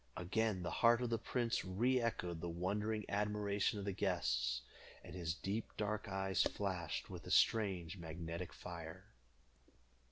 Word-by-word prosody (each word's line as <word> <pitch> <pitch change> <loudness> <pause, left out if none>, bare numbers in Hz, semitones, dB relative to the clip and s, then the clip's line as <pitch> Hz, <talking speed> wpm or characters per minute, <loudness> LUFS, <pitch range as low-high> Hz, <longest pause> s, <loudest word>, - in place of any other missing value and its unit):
Again 100 +1 0
the 85 - -2
heart 120 +1 +6
of 120 - -1
the 115 - +1
prince 120 0 0
re 120 +8 +2
echoed 90 -8 -1
the 85 - -2
wondering 105 +5 -1
admiration 105 0 +1
of 100 - -4
the 100 - 0
guests, 65 - +1 0.4
and - - -9
his 85 -2 -2
deep 100 +3 -3
dark 105 +1 -1
eyes 95 0 +1
flashed 90 -5 -1
with - - -7
a - - -5
strange 95 -5 +3
magnetic 85 +1 -5
fire. 85 +2 -8
95 Hz, 150 wpm, -38 LUFS, 85-105 Hz, 0.4 s, heart